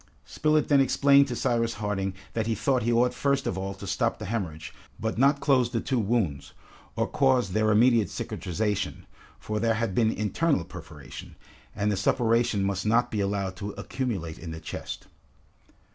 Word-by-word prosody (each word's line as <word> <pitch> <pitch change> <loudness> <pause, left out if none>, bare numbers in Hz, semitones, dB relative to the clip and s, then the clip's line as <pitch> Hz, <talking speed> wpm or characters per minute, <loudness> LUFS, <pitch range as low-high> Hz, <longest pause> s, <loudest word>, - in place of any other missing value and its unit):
Spilett 155 0 +1
then 140 -2 +5
explained 140 +1 +5
to 125 - -3
Cyrus 115 -1 0
Harding 100 -2 -2 0.2
that 110 -1 -1
he 115 - 0
thought 130 +4 +1
he 120 - 0
ought 120 +1 +3
first 140 -1 0
of - - -1
all 95 +1 -4
to 100 - -9
stop 100 +4 0
the 105 - -7
hemorrhage, 90 -8 -4 0.3
but 110 +1 -2
not 140 +2 +4
close 130 -4 +3
the 120 -2 -1
two 130 +2 -1
wounds, 100 - -1 0.4
or - - +1
cause 130 -7 +2
their 110 +3 +2
immediate 115 0 +4
cicatrization, 105 +3 -3 0.3
for 105 0 -3
there 115 0 +2
had 115 -3 -1
been 110 +2 +3
internal 110 - 0
perforation, 70 -4 -10 0.4
and 105 0 0
the 100 - -1
suppuration 115 0 +2
must 95 -1 -1
not 115 +3 +2
be 105 - -1
allowed 100 -1 -1
to 100 0 -5
accumulate 95 -12 -4
in 85 - -7
the 80 0 -6
chest. 80 - -7
110 Hz, 175 wpm, -27 LUFS, 100-125 Hz, 0.4 s, then